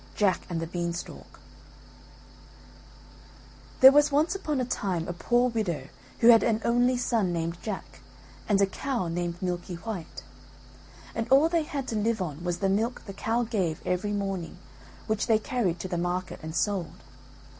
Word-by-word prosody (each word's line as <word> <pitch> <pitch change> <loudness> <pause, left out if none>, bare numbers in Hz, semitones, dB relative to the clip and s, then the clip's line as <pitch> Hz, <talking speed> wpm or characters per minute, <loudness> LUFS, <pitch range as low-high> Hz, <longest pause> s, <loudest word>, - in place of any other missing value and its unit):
JACK 195 -4 +2
AND 170 -2 -2
THE 165 - -2
BEANSTALK 170 0 -5 2.4
There 265 +1 +11
was 295 +1 +4
once 305 +5 +2
upon 305 -8 -2
a 255 - 0
time 185 -8 -2
a 175 - -3
poor 240 +7 +2
widow 175 -12 -2 0.3
who 235 - +7
had 230 -1 +8
an 220 -2 +1
only 245 +2 +3
son 225 -6 +1
named 170 0 -2
Jack, 210 -4 -6 0.5
and 200 -2 +4
a 200 - +5
cow 230 -1 -3
named 175 0 -3
Milky 180 0 -3
white. 180 -1 -7 0.9
And 225 0 -3
all 280 +5 +6
they 335 -1 +2
had 280 -3 -4
to 225 - -2
live 220 +1 0
on 165 -3 -4
was 175 -1 -1
the 195 - 0
milk 220 +5 0
the 195 - -7
cow 225 +4 0
gave 190 -9 -1
every 185 +3 -1
morning 195 -4 -3 0.5
which 215 -1 -1
they 225 - +5
carried 215 -6 -1
to - - -4
the 175 -2 -2
market 180 +1 -2
and 160 0 -6
sold. 195 -4 -2
200 Hz, 165 wpm, -27 LUFS, 175-235 Hz, 2.4 s, There